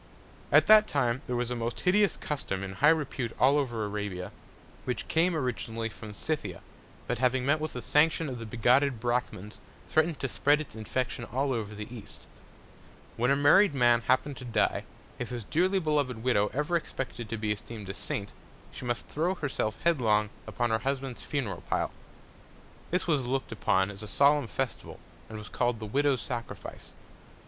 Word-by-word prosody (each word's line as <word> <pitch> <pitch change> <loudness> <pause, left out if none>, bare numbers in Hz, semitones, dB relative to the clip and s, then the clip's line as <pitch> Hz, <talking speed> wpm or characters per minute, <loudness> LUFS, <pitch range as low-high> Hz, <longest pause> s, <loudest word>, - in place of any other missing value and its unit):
At - - +7
that 215 0 +8
Time 130 -3 0
there 125 - -1
was 120 0 -1
a - - -1
most 115 0 -3
hideous 200 +2 +3
Custom 100 -10 -3
in 95 -1 -5
high 145 +10 +4
Repute 140 -7 0
all 140 +3 +5
over 120 -6 -2
Arabia, 105 -3 -4 0.5
which 125 - -3
came 165 +2 +2
originally 115 -5 -2
from 110 0 -10
Scythia; 155 +7 -2 0.4
but - - -2
having 125 0 +2
met 150 +3 +3
with 155 0 -4
the 125 - -6
Sanction 160 +2 +3
of 125 -3 -5
the 115 - -6
bigotted 125 +3 +3
Brachmans, 120 -4 -2 0.3
threatn'd 155 0 +2
to 135 - -1
spread 145 +4 +3
its 155 -7 -7
Infection 120 +3 -3
all 135 +4 -1
over 110 -3 -4
the 105 +4 -7
East. 105 -3 -10 0.9
When 125 +2 +1
a 140 - +5
married 145 +5 +5
Man 120 -2 +4
happen'd 130 +3 +1
to - - -8
die, 115 -4 0 0.3
if 125 - -3
his 120 -2 -5
dearly 185 - +1
beloved 145 -9 0
Widow 105 -5 +3
ever 150 +5 -1
expected 125 -8 -3
to 115 - -3
be 105 0 -1
esteem'd 105 0 -6
a 95 - -4
Saint, 100 +1 -4 0.4
she - - -8
must 120 -1 -2
throw 170 +5 -1
herself 130 - -2
headlong 110 -10 +2 0.2
upon 120 -1 -1
her 110 - +2
Husband's 135 -1 -3
Funeral 135 -9 -3
Pile. - - 0 1.0
This 180 - 0
was 150 -5 +2
look'd 130 0 -2
upon 95 -2 +1
as 100 - -10
a 105 - -6
solemn 140 +5 +4
Festival, 130 +1 -4 0.3
and 110 - -7
was 105 -1 -8
call'd 120 0 0
the 110 - -5
Widow's 135 +2 +1
Sacrifice. 120 +1 -7
125 Hz, 180 wpm, -29 LUFS, 110-145 Hz, 1.0 s, that